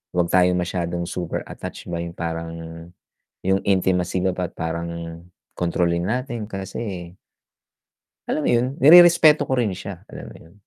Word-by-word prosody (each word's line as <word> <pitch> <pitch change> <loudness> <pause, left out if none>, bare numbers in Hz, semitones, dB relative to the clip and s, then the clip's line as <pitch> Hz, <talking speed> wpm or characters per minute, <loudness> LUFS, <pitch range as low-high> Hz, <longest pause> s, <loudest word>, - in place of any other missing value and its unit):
'wag 90 -1 +2
tayo 90 0 +4
masyadong 85 -1 -2
super 85 -2 -4
attached - - -8
ba 85 - -2
yung 85 0 -7
parang, 80 0 -4 1.0
yung 95 0 +3
intimacy 95 -2 +1
ba't 90 -2 -2
parang 85 0 -5 0.4
kontrolin 85 0 0
natin 120 -1 -3
kasi 95 -3 -6 1.1
alam 155 - -1
mo - - +1
yun? 120 +1 +2
Nirerespeto 160 0 +7
ko - - 0
rin 110 -4 +1
siya, 95 0 -8
alam - - -9
mo - - -13
yun? 80 - -18
90 Hz, 140 wpm, -22 LUFS, 85-100 Hz, 1.1 s, Nirerespeto